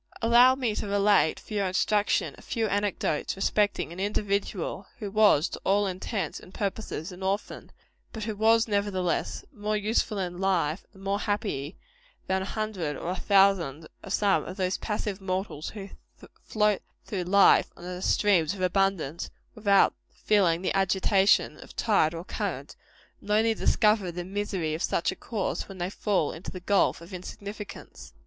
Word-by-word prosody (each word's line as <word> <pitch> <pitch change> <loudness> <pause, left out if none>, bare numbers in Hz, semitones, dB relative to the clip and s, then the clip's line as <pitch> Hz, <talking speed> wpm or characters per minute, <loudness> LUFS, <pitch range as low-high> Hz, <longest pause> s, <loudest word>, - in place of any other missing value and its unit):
Allow 240 +3 +6
me 250 -5 -1
to - - -3
relate, 200 -4 +3
for - - -11
your 200 -2 +1
instruction, 205 +3 +1
a - - -15
few 230 -2 -2
anecdotes 200 -7 -1
respecting 205 -3 0
an 175 - -9
individual, 200 -2 -2
who 210 -4 -5
was, 205 -7 +5
to - - -7
all 200 +2 +2
intents 195 +2 -3
and - - -15
purposes, 195 -4 -4
an 180 +1 -11
orphan, 195 +2 -3 0.4
but 220 - -6
who 215 -1 -3
was, 225 +2 +4
nevertheless, 200 -4 -1
more 210 -2 -2
useful 215 +1 0
in 180 -2 -3
life, 180 -4 0
and 190 - -14
more 200 +1 0
truly - - -5
happy, 200 - -2 0.5
than 190 0 0
a - - -3
hundred 195 -8 -3
or 175 - -3
a - - -2
thousand 190 -7 +2
of 195 - -9
some 200 -1 +2
of 185 - -7
those 185 -1 0
passive 210 -2 -3
mortals 185 -5 -3
who 200 -2 -8 0.5
float 210 -2 +1 0.2
through 185 -4 -3
life 200 +2 +5
on - - -12
the 180 0 -6
streams 190 -4 +2
of 190 - -8
abundance, 185 -4 0 0.2
without 200 -2 +4 0.2
feeling 185 -5 +1
the 190 - 0
agitation 195 +1 +3
of - - -13
tide 170 -8 +2
or 165 - -5
current, - - -4 0.5
and - - -13
only 220 +2 +3
discover 210 -4 +2
the 175 +1 -5
misery 190 -5 -2
of 160 - -4
such 170 - +1
a - - -7
course 210 0 -3
when 195 - -9
they 180 +1 -3
fall 195 -8 0
into 165 - -8
the 185 - -7
gulf 195 -1 +2
of 170 +3 -12
insignificance. 200 +3 -9
195 Hz, 170 wpm, -27 LUFS, 180-210 Hz, 0.5 s, Allow